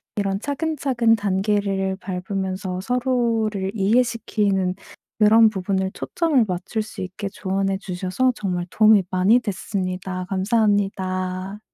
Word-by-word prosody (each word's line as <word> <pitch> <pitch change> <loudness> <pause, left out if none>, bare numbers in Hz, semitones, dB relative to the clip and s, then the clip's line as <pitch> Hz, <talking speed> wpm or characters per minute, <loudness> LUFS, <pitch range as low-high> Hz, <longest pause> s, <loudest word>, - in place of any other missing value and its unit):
이런 195 -1 -1
차근차근 275 -4 +1
단계를 195 -1 0
밟으면서 185 0 -4
서로를 230 -4 0
이해시키는 205 -3 +1 0.4
그런 220 +1 +6
부분을 190 -1 -2
초점을 300 -9 +1
맞출 185 +5 -3
수 215 - -9
있게 190 +2 -5
조언해 195 0 -1
주셔서 190 +6 -1
정말 180 -5 -2
도움이 215 -1 +5
많이 190 +6 +4
됐습니다. 185 -3 -4
감사합니다. 195 -2 0
195 Hz, 285 characters per minute, -22 LUFS, 190-220 Hz, 0.4 s, 그런